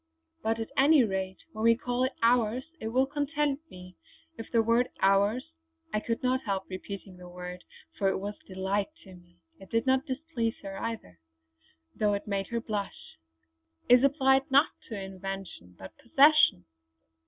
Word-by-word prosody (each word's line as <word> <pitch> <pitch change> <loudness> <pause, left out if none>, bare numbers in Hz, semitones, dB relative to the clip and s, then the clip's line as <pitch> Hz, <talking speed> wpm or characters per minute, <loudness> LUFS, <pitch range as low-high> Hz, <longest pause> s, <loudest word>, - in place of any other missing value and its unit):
But 225 +1 0
at 225 - -5
any 280 0 +6
rate 190 -3 -2 0.2
when 215 - -6
we 230 0 +5
call 245 0 -1
it 260 - -2
'ours' 235 +1 +3
it 220 - -4
will 255 +4 +2
content 290 0 -1
me 180 0 -12 0.4
if 225 - -9
the 230 -2 +3
word 230 +2 +2
'ours'" 205 +9 +2 0.4
I 215 - +2
could 230 +3 -3
not 255 +1 +1
help 195 -2 -2
repeating 190 0 -8
the 180 0 -11
word 180 0 -8 0.4
for 195 - +3
it - - 0
was 205 +2 -4
delight 190 +1 -1 0.2
to 190 - -13
me; 175 -1 -18 0.2
it 195 - -13
did 230 +2 0
not 260 0 +2
displease 260 -4 -2
her 195 0 -6
either, 220 - -6 0.8
though 210 -1 +2
it 200 - -5
made 195 -2 -2
her 235 - -2
blush 210 - -6 0.7
"is 245 +1 +7
applied 270 0 +3
not 280 +3 +5 0.2
to 220 -4 -4
invention 190 - -7
but 95 - -11
to 235 - -22
possession!" 295 - +5
220 Hz, 170 wpm, -29 LUFS, 195-255 Hz, 0.8 s, is